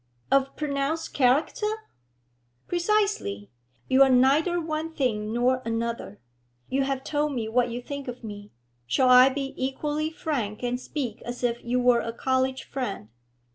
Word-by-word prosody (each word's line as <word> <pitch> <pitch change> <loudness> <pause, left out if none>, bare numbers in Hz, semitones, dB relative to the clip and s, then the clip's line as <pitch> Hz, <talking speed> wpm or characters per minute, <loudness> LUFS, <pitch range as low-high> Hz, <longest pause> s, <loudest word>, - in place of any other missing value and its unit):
'Of 275 0 +2
pronounced 295 +2 -2
character?' 325 - +1 0.8
'Precisely. 350 - 0 0.4
You 260 +1 +4
are 270 - +8
neither 280 +8 +4
one 320 0 -3
thing 215 -6 -1
nor 250 +2 +2
another. 230 - -3 0.5
You 270 +1 +1
have 270 -1 -2
told 295 0 -1
me 225 -3 -2
what 245 +2 +2
you 240 +1 -5
think 280 0 -6
of 245 0 -7
me; 205 -1 -8 0.4
shall 255 - +3
I 250 +1 +8
be 270 0 -4
equally 295 +3 -1
frank 250 -10 -3
and 245 0 -1
speak 255 -5 -4
as 245 +1 -6
if 240 -1 0
you 245 +1 0
were 245 -1 +4
a 230 - -4
college 260 +1 0
friend? 225 - -5
260 Hz, 150 wpm, -26 LUFS, 240-295 Hz, 0.8 s, are